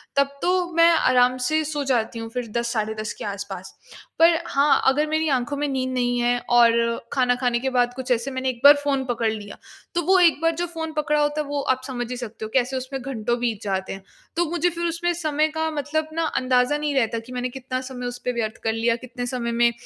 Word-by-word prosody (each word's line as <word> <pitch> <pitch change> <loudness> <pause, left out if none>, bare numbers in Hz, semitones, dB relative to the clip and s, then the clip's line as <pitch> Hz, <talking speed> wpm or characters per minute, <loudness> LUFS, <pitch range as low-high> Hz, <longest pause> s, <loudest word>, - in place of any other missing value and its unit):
तब 280 0 +4
तो 355 - +2 0.2
मैं 335 0 +6
आराम 255 -5 +3
से 310 0 +1
सो 295 -1 -2
जाती 235 -4 0
हूँ 225 0 -6
फिर 245 0 -4
10 235 0 -1
साढ़े 215 -1 -1
10 215 - -4
के - - -8
आस-पास। 200 -2 -6 0.5
पर 330 0 +6
हाँ, 280 +1 +3
अगर 295 +3 +3
मेरी 315 +1 0
आँखों 265 +1 0
में 295 +1 -1
नींद 260 -2 -2
नहीं 245 -1 0
है 245 0 +2
और 235 -1 +4
खाना 250 -2 +2
खाने 245 -1 0
के 265 - -1
बाद 245 -1 +1
कुछ 260 0 -5
ऐसे 245 +3 0
मैंने 260 0 -1
एक 240 -2 -6
बार 285 +1 +10
फ़ोन 275 -2 0
पकड़ 230 -3 0
लिया 205 -2 -7 0.4
तो 345 - +2
वो 380 +2 +5
एक 340 -4 +5
बार 330 0 +3
जो 350 +2 -1
फ़ोन 325 -1 -5
पकड़ा 300 -1 +1
होता 295 +1 +1
है 295 - -6
वो 285 0 -2
आप 260 0 -1
समझ 245 -2 -4
ही 250 - -3
सकते 230 -2 -7
हो - - -7
कैसे 260 0 +1
उसमें 260 +1 -5
घंटों 240 -2 -2
बीत 230 -3 -2
जाते 190 -2 -2
हैं। 195 0 -10 0.3
तो 345 +1 +2
मुझे 345 0 +1
फिर 340 0 -4
उसमें 340 +1 -1
समय 310 -2 0
का 320 0 0
मतलब 305 +1 -2
न 330 - -1 0.2
अंदाजा 255 +2 +2
नहीं 295 -1 -2
रहता 230 -3 +1
कि 230 +3 -13
मैंने 250 0 -2
कितना 255 0 -4
समय 255 -1 -7
उस 245 0 -5
पे 250 - +1
व्यर्थ 220 -2 -3
कर 220 - +1
लिया, 230 +1 +1
कितने 245 +1 -6
समय 245 -1 -3
में 235 0 +3
255 Hz, 240 wpm, -23 LUFS, 235-295 Hz, 0.5 s, बार